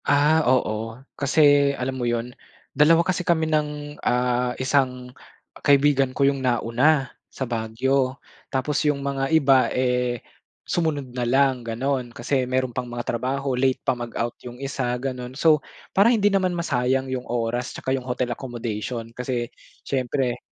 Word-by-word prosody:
Ah, 150 Hz, +3 st, +4 dB
oo 115 Hz, -3 st, 0 dB, 0.2 s
kasi 145 Hz, -1 st, +4 dB
alam 130 Hz, +1 st, -2 dB
mo 120 Hz, -, 0 dB
'yun, 120 Hz, +1 st, -2 dB, 0.4 s
dalawa 165 Hz, +4 st, +5 dB
kasi 185 Hz, -1 st, 0 dB
kami 170 Hz, -2 st, +1 dB
ng, 150 Hz, -1 st, -2 dB
ah, 125 Hz, 0 st, 0 dB
isang 130 Hz, -2 st, 0 dB, 0.5 s
kaibigan 140 Hz, -1 st, +4 dB
ko 140 Hz, -, +3 dB
'yung 140 Hz, -1 st, +1 dB
nauna 130 Hz, +4 st, +2 dB, 0.3 s
sa 130 Hz, -, -4 dB
Baguio. 130 Hz, +4 st, 0 dB, 0.3 s
Tapos, 135 Hz, +2 st, 0 dB
yung 145 Hz, -1 st, 0 dB
mga 135 Hz, -1 st, -1 dB
iba, 140 Hz, -5 st, +4 dB
eh, 125 Hz, -1 st, 0 dB, 0.5 s
sumunod 145 Hz, -7 st, -1 dB
na 125 Hz, -, -2 dB
lang 135 Hz, 0 st, +3 dB
ganon 125 Hz, +2 st, -2 dB
kasi 130 Hz, +3 st, -1 dB
meron 130 Hz, -1 st, 0 dB
pang 125 Hz, -, -1 dB
mga 120 Hz, 0 st, -5 dB
trabaho, 130 Hz, +3 st, -1 dB
late 130 Hz, +1 st, +2 dB
pa -, -, +3 dB
mag-out 120 Hz, 0 st, -3 dB
'yung 125 Hz, 0 st, -9 dB
isa 135 Hz, -2 st, -2 dB
ganon. 125 Hz, 0 st, -5 dB
So 155 Hz, -2 st, +4 dB, 0.3 s
para 200 Hz, +4 st, +5 dB
hindi 220 Hz, -4 st, +3 dB
naman 185 Hz, -2 st, +2 dB
masayang 130 Hz, -5 st, 0 dB
'yung 130 Hz, -1 st, -2 dB
oras 120 Hz, +1 st, -1 dB
'tsaka 130 Hz, -, -2 dB
'yung 130 Hz, -2 st, -2 dB
hotel 125 Hz, -1 st, -1 dB
accommodation 115 Hz, -2 st, -5 dB
kasi 125 Hz, -1 st, -3 dB, 0.3 s
siyempre 130 Hz, -1 st, -1 dB
130 Hz, 150 wpm, -24 LUFS, 125-140 Hz, 0.5 s, dalawa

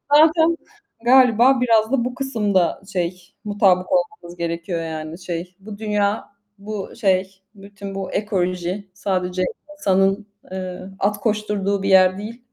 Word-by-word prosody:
Zaten 320 Hz, +2 st, +5 dB, 0.5 s
galiba 250 Hz, 0 st, +6 dB
biraz 225 Hz, -2 st, +3 dB
da 255 Hz, -3 st, +2 dB
bu 250 Hz, 0 st, -3 dB
kısımda 210 Hz, -9 st, 0 dB
şey, 180 Hz, 0 st, -3 dB
mutabık 195 Hz, -3 st, +3 dB
olmamız 270 Hz, -11 st, -1 dB
gerekiyor. 170 Hz, 0 st, -3 dB
Yani, 160 Hz, 0 st, -6 dB
şey, 175 Hz, 0 st, -5 dB
bu 205 Hz, +1 st, -9 dB
dünya, 210 Hz, -1 st, -1 dB, 0.3 s
bu 205 Hz, 0 st, -6 dB
şey 190 Hz, -3 st, 0 dB
bütün 200 Hz, 0 st, -9 dB
bu 195 Hz, -1 st, -4 dB
ekoloji 185 Hz, -1 st, -2 dB
sadece 185 Hz, -2 st, -1 dB, 0.3 s
insanın, 195 Hz, -3 st, +2 dB, 0.3 s
ııı, 185 Hz, 0 st, -6 dB
at 205 Hz, +1 st, +1 dB
koşturduğu 210 Hz, -2 st, 0 dB
bir 195 Hz, -, 0 dB
yer 185 Hz, -1 st, +6 dB
değil 225 Hz, +4 st, -7 dB
200 Hz, 130 wpm, -21 LUFS, 185-220 Hz, 0.5 s, galiba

